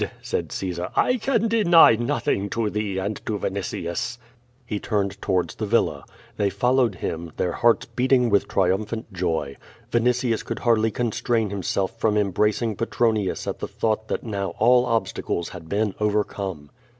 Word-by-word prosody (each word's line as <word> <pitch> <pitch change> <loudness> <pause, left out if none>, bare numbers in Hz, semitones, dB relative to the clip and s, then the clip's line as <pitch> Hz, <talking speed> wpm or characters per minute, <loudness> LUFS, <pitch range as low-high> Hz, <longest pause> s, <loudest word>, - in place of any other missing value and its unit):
said - - -3
Caesar. 90 -2 -3
"1 250 0 +2
can 230 -2 +1
deny 175 - +6
nothing 120 -4 -1
to 110 -1 -1
thee 105 -2 -2
and 100 +2 -3
to 110 - -2
Vinitius." 100 +4 -3 0.5
lie 105 - 0
turned 100 -2 -2
towards 95 -3 0
the 110 - -4
villa. 115 +3 +1 0.3
They 100 - +2
followed 125 +2 +2
him, 85 -1 -4
their 90 - 0
hearts 115 +6 +2
beating 125 -2 +2
with 100 - +3
triumphant 100 +4 -1
joy. 80 -6 -2 0.3
Vinitius 120 -1 +1
could - - -4
hardly 110 -2 +4
constrain 115 -1 -1
himself 100 +2 -2
from 110 -2 +2
embracing 105 +2 +1
Petronius 110 -4 0
at - - -4
the - - -4
thought 110 0 -1
that - - -3
now 100 -4 -3
all 125 +2 +4
obstacles 110 -6 -1
had 85 -3 -10
been 105 0 0
overcome. 100 -7 -2
105 Hz, 150 wpm, -24 LUFS, 95-120 Hz, 0.5 s, deny